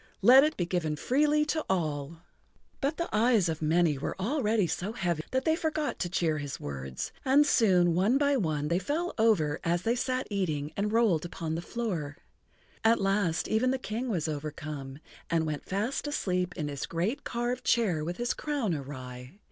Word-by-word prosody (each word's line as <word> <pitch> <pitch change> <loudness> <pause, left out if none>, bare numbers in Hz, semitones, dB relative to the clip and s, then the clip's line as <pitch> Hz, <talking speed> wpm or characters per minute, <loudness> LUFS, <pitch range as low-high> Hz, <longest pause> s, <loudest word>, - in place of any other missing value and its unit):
Let 260 +3 +9
it 310 +1 0
be 175 - 0
given 170 -4 -1
freely 300 - +2
to 315 +1 -1
all." 160 -3 -2 0.6
But 285 +3 -1
the 340 - -1
eyes 220 -4 +4
of 160 -1 -3
many 160 -2 +2
were 145 - -4
already 220 -2 +1
so 185 +5 -3
heavy 175 -7 -1
that 260 +1 -1
they 320 -1 +3
forgot 310 -2 -2
to 175 - -1
cheer 165 -3 0
his 145 -2 -5
words, 65 -2 -5
and 285 +2 +5
soon 185 - +4
one 200 +9 +3
by 285 0 +3
one 155 - -1
they 170 +2 +2
fell 315 - -2
over 165 -10 +3
as 170 +1 0
they 230 - +2
sat 255 +1 -1
eating 155 -7 -1
and 210 +1 -1
rolled 220 -9 +3
upon 165 -2 -4
the 165 - -2
floor. 175 -10 -4 0.7
At 225 +1 +4
last 195 -4 +1
even 225 +4 +2
the 265 - +1
King 245 +1 -4
was 170 -7 -1
overcome, 145 -2 -5 0.3
and 165 -1 +1
went 150 -2 -4
fast 220 +10 -1
asleep 180 -10 -1
in 150 -3 -2
his 140 -2 -4
great 200 +12 -2
carved 245 +1 -2
chair 195 -10 +2
with 175 +3 -4
his 240 0 0
crown 280 - -1
awry. 130 0 -7
185 Hz, 185 wpm, -29 LUFS, 155-245 Hz, 0.7 s, Let